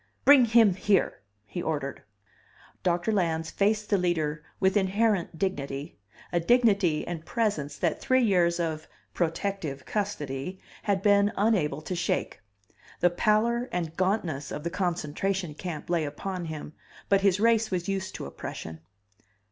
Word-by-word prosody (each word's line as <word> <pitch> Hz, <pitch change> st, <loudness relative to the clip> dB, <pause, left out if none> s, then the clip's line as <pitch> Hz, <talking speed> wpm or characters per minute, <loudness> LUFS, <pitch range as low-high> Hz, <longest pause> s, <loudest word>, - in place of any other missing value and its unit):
"Bring 280 Hz, -3 st, +8 dB
him 225 Hz, -3 st, +5 dB
here!" 190 Hz, -, +1 dB, 0.2 s
he 175 Hz, -, -5 dB
ordered. 145 Hz, -4 st, -3 dB, 0.8 s
DOCTOR 175 Hz, +4 st, +1 dB
LANS 165 Hz, -5 st, 0 dB
FACED 210 Hz, +1 st, +1 dB
THE 200 Hz, -, +4 dB
LEADER 160 Hz, -4 st, 0 dB, 0.2 s
with 190 Hz, +1 st, +2 dB
inherent 200 Hz, -3 st, +1 dB
dignity, 145 Hz, -, -3 dB, 0.3 s
a 175 Hz, -, +2 dB
dignity 200 Hz, -5 st, +3 dB
and 170 Hz, -2 st, -4 dB
presence 200 Hz, -9 st, -1 dB
that 170 Hz, -3 st, -1 dB
three 260 Hz, 0 st, +3 dB
years 175 Hz, -5 st, +3 dB
of 160 Hz, -2 st, -2 dB, 0.3 s
"protective 165 Hz, -4 st, -2 dB
custody" 180 Hz, -5 st, -3 dB, 0.2 s
had 195 Hz, -2 st, 0 dB
been 205 Hz, 0 st, +4 dB
unable 175 Hz, -9 st, +1 dB
to 185 Hz, -, -4 dB
shake. 170 Hz, -, -2 dB, 0.6 s
The 175 Hz, -, +4 dB
pallor 230 Hz, +6 st, +2 dB
and 165 Hz, -2 st, -3 dB
gauntness 185 Hz, -7 st, -1 dB
of 150 Hz, -, -5 dB
the 170 Hz, -, -2 dB
concentration 180 Hz, 0 st, -1 dB
camp 160 Hz, 0 st, -6 dB
lay 170 Hz, -2 st, +1 dB
upon 175 Hz, +5 st, -4 dB
him, 155 Hz, -1 st, -6 dB, 0.3 s
but 195 Hz, -1 st, +3 dB
his 195 Hz, -1 st, +3 dB
race 225 Hz, 0 st, +3 dB
was 180 Hz, -2 st, -2 dB
used 195 Hz, -1 st, -3 dB
to -, -, -5 dB
oppression. 80 Hz, 0 st, -7 dB
180 Hz, 140 wpm, -27 LUFS, 160-205 Hz, 0.8 s, Bring